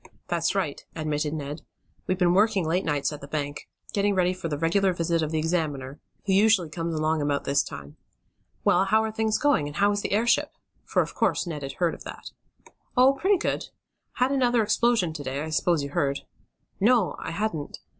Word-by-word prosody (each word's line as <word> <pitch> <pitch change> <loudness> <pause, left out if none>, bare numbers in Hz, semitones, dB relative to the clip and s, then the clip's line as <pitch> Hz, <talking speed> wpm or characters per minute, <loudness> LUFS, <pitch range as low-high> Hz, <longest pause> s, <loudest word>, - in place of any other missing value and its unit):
"That's 170 +2 0
right," 175 -8 -2
admitted 150 -1 -1
Ned. 150 0 -5 0.5
"We've 185 - 0
been 175 -2 +3
working 200 -2 +3
late 180 +4 +1
nights 150 -1 0
at 150 - -8
the 140 - -9
bank. 145 -1 -4 0.2
Getting 200 0 +1
ready 180 -1 +2
for 185 -2 -5
the 150 -3 -2
regular 185 +5 +2
visit 170 -1 0
of 155 - -1
the 160 - -1
examiner, 155 -4 -2 0.3
who 195 - +1
usually 200 -4 +4
comes 165 0 -3
along 155 0 +1
about 145 -1 0
this 140 0 +2
time. 70 +1 -9 0.7
Well, 180 +2 +4
how 220 +3 +3
are 220 - -2
things 220 0 0
going; 285 - +2
and 145 - -8
how 205 +3 +3
is 205 0 -1
the - - -2
airship?" 230 +4 +2 0.3
for, - - +2
of - - -9
course, - - +1
Ned 160 -4 -5
had 135 -1 -5
heard 170 +2 0
of - - -10
that. - - -8 0.7
"Oh, 260 +2 +6
pretty 380 +8 +2
good. - - -2 0.5
Had 255 +2 +1
another 245 -4 +3
explosion 220 -6 +2
to 150 -2 -6
day, 135 +2 -3
I 160 - -5
s'pose 165 -1 +1
you 140 - -5
heard." 140 -1 0 0.6
"No, 220 -1 +3
I - - -5
hadn't." 165 -4 -3
170 Hz, 205 wpm, -26 LUFS, 150-205 Hz, 0.7 s, Oh